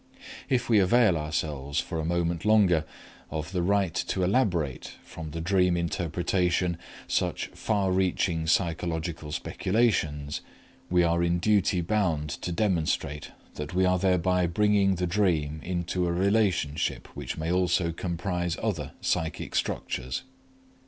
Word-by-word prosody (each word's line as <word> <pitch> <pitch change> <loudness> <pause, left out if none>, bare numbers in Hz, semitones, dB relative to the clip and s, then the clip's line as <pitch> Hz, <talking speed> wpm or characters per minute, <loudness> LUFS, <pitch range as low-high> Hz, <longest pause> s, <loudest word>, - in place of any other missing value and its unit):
If 125 -2 +1
we 110 -3 +5
avail 105 0 +4
ourselves 75 -3 -2
for 80 - -3
a 80 - -2
moment 85 0 0
longer 100 -7 +4 0.4
of 80 +2 -4
the 90 -2 0
right 95 -1 +1
to 95 +2 -1
elaborate 90 - 0
from 80 -1 -8
the 80 +2 -5
dream 90 0 +2
interpretation 85 +1 0 0.3
such - - -1
far 100 -4 0
reaching 90 -3 +1
psychological 80 -2 -1
speculations, 75 -8 0 0.5
we 90 -1 +4
are 85 0 +2
in 85 0 +2
duty 95 -1 +2
bound 85 -6 0
to 90 - -3
demonstrate 85 -6 -1 0.2
that 75 +3 -6
we 95 0 +3
are 90 0 +2
thereby 90 -1 +2
bringing 100 +1 +3
the 90 0 -1
dream 85 -5 0
into 90 0 -1
a - - 0
relationship 95 -5 +1
which - - -5
may 80 +1 -2
also 90 -2 +2
comprise 85 0 -2
other 85 -11 -2
psychic 80 -2 -2
structures. 65 0 -2
85 Hz, 130 wpm, -27 LUFS, 80-95 Hz, 0.5 s, we